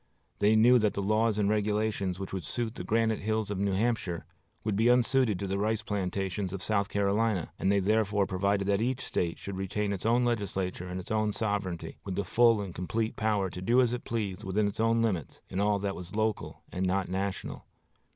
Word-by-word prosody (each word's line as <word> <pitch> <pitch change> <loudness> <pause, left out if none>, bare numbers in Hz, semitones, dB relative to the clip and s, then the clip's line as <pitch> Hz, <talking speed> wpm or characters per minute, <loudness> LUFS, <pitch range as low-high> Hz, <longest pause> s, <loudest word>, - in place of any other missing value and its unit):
They 105 +2 +4
knew 120 +3 +6
that 105 -2 +1
the 100 - -1
laws 110 +1 +2
and 105 -1 +2
regulations 105 -2 0
which 95 - -6
would 95 -3 -3
suit 115 +7 -3
the - - -6
granite 110 0 +1
hills 110 0 -1
of 100 - -2
New 100 0 +1
Hampshire 100 -5 -1 0.4
would 105 -2 0
be 110 +3 +3
unsuited 125 -3 +3
to 100 - -4
the 95 0 -2
rice 110 +1 0
plantations 95 -1 -2
of 95 0 -5
South 100 -2 0
Carolina; 100 -2 +1
and 95 - +2
they 100 - +3
therefore 105 0 +2
provided 100 +1 0
that 100 +1 +2
each 130 +2 0
State 85 -2 -1
should 100 -1 -6
retain 100 +2 -1
its 95 - -5
own 120 +2 +3
legislature 95 -6 -2
and 90 +1 -4
its 90 - -8
own 110 -1 +1
sovereignty, 100 -6 -3
with 95 - -4
the 100 0 -1
full 115 +2 +4
and 95 -3 -6
complete 110 +6 -2
power 105 -3 +1
to 90 - -7
do 120 +7 +3
as 125 -2 +3
it 125 - -4
pleased 105 -5 -3
within 100 +2 +1
its 100 - -5
own 115 0 +3
limits, 90 - -2
in 95 - -3
all 105 0 +3
that 100 -1 -2
was 90 +3 -8
local 110 -1 -2
and 90 - -2
not 95 0 0
national. 95 +1 -4
105 Hz, 215 wpm, -29 LUFS, 95-110 Hz, 0.4 s, knew